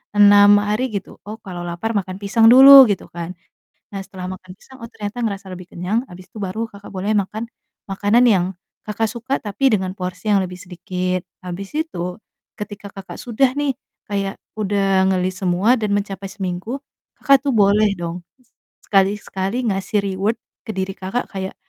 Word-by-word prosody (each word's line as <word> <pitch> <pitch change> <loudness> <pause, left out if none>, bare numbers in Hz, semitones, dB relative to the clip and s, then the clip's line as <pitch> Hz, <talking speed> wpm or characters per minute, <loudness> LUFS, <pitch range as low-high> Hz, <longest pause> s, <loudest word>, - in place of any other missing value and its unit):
6 205 0 +7
hari 215 +5 0
gitu. 195 - -6
Oh, 215 - -5
kalau 175 -3 -7
lapar 175 +6 -3
makan 185 -1 -3
pisang 225 +3 +3
dulu 270 +3 +11
gitu 200 -3 -2
kan. 170 +1 -6 0.6
Nah, 200 - -4
setelah 185 -1 -7
makan 185 0 -11
pisang, 265 +4 -17
oh, 230 - -7
ternyata 215 +1 -6
ngerasa 200 -2 -5
lebih 180 -1 -9
kenyang 210 +9 -1
habis 180 +1 -12
itu - - -10
baru, 200 +4 -3
Kakak, 200 0 -12
boleh 195 +3 -1
makan 210 +3 -3 0.5
makanan 205 +5 +3
yang, 190 -4 +3 0.4
Kakak 220 +1 -1
suka 250 +3 -2
tapi 215 +6 +1
dengan 185 -1 -3
porsi 185 +4 -4
yang 200 - +5
lebih 180 -1 -4
sedikit. 180 +1 -3 0.2
Habis 190 +7 -6
itu 180 - -5 0.4
ketika, 205 0 -7
Kakak, 195 - -9
sudah 250 +2 +1
nih 290 -2 0 0.4
kayak 195 -1 -2 0.2
udah 195 -2 +2
nge-list 185 0 -1
semua 185 +7 +3
dan 215 -2 -1
mencapai 200 -1 -4
seminggu, 195 +5 -4 0.4
Kakak, 275 -2 +4
tuh 275 - +2
boleh 210 0 +4
dong 170 +1 -5 0.7
sekali-sekali 200 +3 0
ngasih 195 +2 0
reward 195 +3 0 0.3
ke - - -5
diri, 190 0 -2
Kakak, 195 +7 -3
kayak, 190 -1 -5
200 Hz, 165 wpm, -20 LUFS, 185-220 Hz, 0.7 s, dulu